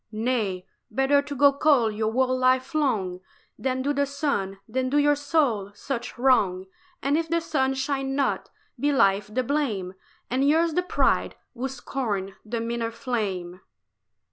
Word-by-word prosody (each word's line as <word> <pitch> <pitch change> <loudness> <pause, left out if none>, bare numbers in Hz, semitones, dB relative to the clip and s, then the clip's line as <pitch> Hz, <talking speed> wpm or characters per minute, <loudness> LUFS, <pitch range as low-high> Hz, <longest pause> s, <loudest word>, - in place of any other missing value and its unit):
"Nay, 215 -5 -1 0.2
better 270 +5 +3
to 285 0 -7
go 280 +1 +5
cold 275 -6 +3
your 215 +1 -1
whole 255 +2 +2
life 255 +3 +2
long 215 -12 0 0.4
Than 260 -1 -1
do 285 +1 +1
the 285 0 +1
sun, 275 -9 -2
than 255 +3 -1
do 290 - +1
your 290 0 +5
soul 285 -9 +1
such 240 +2 -5
wrong: 210 -8 +3 0.4
And 285 +3 +2
if 330 -1 -3
the 335 0 +2
sun 270 -5 0
shine 270 0 -2
not, 275 -1 0 0.3
be 290 +3 +2
life's 200 -7 +3
the 245 +5 -1
blame 230 -10 -1 0.3
And 265 +3 +2
yours 325 +2 +3
the 360 - +2
pride, 360 - +1 0.2
who 255 +1 -3
scorned 215 -8 -3
the 230 +2 -3
meaner 230 0 -2
flame." 210 -7 -3
255 Hz, 160 wpm, -25 LUFS, 215-280 Hz, 0.4 s, go